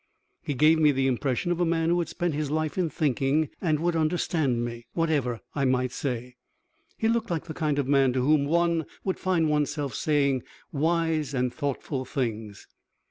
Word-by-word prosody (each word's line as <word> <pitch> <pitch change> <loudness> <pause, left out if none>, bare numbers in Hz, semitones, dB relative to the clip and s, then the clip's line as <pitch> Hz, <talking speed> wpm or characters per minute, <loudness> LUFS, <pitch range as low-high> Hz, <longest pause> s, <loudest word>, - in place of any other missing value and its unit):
He 145 - -3
gave 155 +4 +5
me 150 -2 +5
the 135 -1 0
impression 130 +5 0
of 175 - -1
a - - +3
man 165 0 +1
who 175 +1 +2
had 170 - -2
spent 175 -3 -2
his 150 -1 -2
life 155 0 -1
in 180 -3 0
thinking 145 +1 +1
and 155 -5 +1
would 170 +1 0
understand 155 -6 0
me, 120 0 -7
whatever 145 -8 0
I 140 -2 0
might 130 -1 +1
say. 125 -2 -4 0.6
He 220 - +1
looked 230 0 0
like 165 -3 -2
the 160 - -6
kind 155 -4 -1
of 140 -2 0
man 135 -2 +4
to 130 - +1
whom 150 -1 +4
one 170 0 +1 0.2
would 190 - -2
find 180 -4 +1
one's 150 -2 +1
self 145 -5 -3
saying 140 -1 +1 0.3
wise 160 -1 0
and 125 -1 0
thoughtful 140 -2 -3
things. 115 -6 -4
150 Hz, 190 wpm, -26 LUFS, 130-165 Hz, 0.6 s, gave